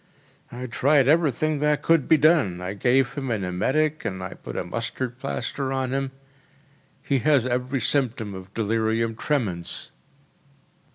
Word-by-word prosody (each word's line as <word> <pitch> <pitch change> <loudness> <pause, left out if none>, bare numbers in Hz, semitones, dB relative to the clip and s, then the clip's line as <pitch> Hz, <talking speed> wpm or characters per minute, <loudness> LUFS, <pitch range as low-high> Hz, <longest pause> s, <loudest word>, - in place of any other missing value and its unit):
“I 125 +1 -6
tried 135 +3 +3
everything 155 -1 +2
that 150 0 +1
could 165 -4 +3
be 160 - +6
done. 145 - +3
I 90 +2 -4
gave 125 +5 +2
him 135 -2 -4
an 110 -4 -1
emetic 145 +13 0
and 95 -1 -3 0.2
put - - -7
a - - -1
mustard 120 +5 -4
plaster 130 - -3
on 130 -1 -1
him. 135 0 -1 0.9
He 135 -2 +1
has 140 -2 +3
every 125 +1 -1
symptom 115 -5 0
of 95 0 -9
delirium 115 +1 0
tremens. 110 - -2
125 Hz, 145 wpm, -24 LUFS, 110-145 Hz, 0.9 s, be